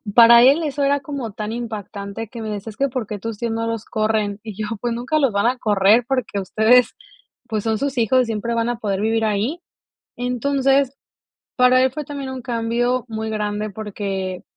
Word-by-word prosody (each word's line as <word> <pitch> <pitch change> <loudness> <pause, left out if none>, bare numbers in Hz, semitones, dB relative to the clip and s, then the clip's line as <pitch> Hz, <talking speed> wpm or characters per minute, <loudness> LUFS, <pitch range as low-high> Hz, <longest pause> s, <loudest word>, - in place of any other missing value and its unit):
Para 235 0 +9
él 285 +6 +5
eso 290 -2 -1
era 280 0 +2
como 270 -5 -5
tan 210 +1 -5
impactante 220 -2 -6
que 235 -2 -8
me 220 - -4
decía: 205 +1 -5
"Es 210 - -18
que, 275 - +2
¿por 250 -3 -3
qué 210 0 -6
tus 225 +1 -5
tíos 235 0 -2
no 230 0 -2
los 230 -1 -3
corren?", 215 -2 -1
y 215 -3 -7
yo, 215 0 -4
pues 240 -1 -1
nunca 255 +6 -1
los 275 -6 +2
van 200 +1 0
a 255 +1 +1
correr 210 +1 +3
porque 255 -6 -1
ustedes 220 +5 +3 0.5
pues 215 -2 -2
son 220 -1 0
sus 275 +2 -3
hijos, 250 +2 +3
siempre 230 +1 -2
van 230 0 0
a 240 - -2
poder 200 -3 -2
vivir 225 +1 +1
ahí. 215 +10 -1 0.6
Entonces, 270 +2 +1 0.6
para 250 0 +5
él 260 - +2
fue 300 +3 -5
también 280 -2 -6
un 260 -1 -6
cambio 240 +1 -1
muy 220 -1 -4
grande, 210 0 -2
porque 195 -3 -4
230 Hz, 200 wpm, -21 LUFS, 215-255 Hz, 0.6 s, Para